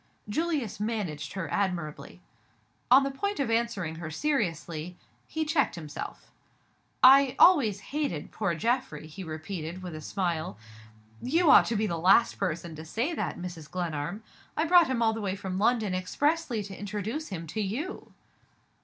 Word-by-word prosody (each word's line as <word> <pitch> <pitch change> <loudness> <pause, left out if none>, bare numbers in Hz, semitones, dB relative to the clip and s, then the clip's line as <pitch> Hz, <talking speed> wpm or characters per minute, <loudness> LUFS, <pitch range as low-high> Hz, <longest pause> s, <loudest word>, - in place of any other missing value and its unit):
Julius 285 - -1
managed 200 -9 -3
her 190 -4 -3
admirably. 180 -6 -3 0.7
On 265 +3 +8
the 275 - -1
point 405 +9 -3
of 265 -5 0
answering 225 -9 -1
her 165 -2 -6
seriously, 175 - -2 0.3
he 315 0 -2
checked 300 - +1
himself. 155 -4 -8 0.7
"I 270 0 +8
always 245 - +6
hated 285 - -2
poor 195 -6 -1
Geoffrey," 245 +3 -1
he 155 +5 -8
repeated, 165 +2 -6
with 180 -2 -6
a 155 - -7
smile. 170 - -2 0.6
"You 325 +4 +3
ought - - +8
to 230 - -1
be 215 +1 +1
the 170 -5 -2
last 195 +7 +4
person 170 -3 -2
to 155 - -7
say 230 - -2
that, - - -3
Mrs. 175 -4 -7
Glenarm! 175 +2 -3 0.3
I 315 - +2
brought 345 -1 +6
him 250 -3 0
all 220 -1 +3
the 225 - -4
way 195 -2 -1
from 190 -1 -4
London 220 -2 +2
expressly 250 - 0
to 195 -1 -8
introduce 210 +10 -4
him 170 -4 -6
to 165 +7 -5
_you. 245 - -4
200 Hz, 160 wpm, -28 LUFS, 170-260 Hz, 0.7 s, On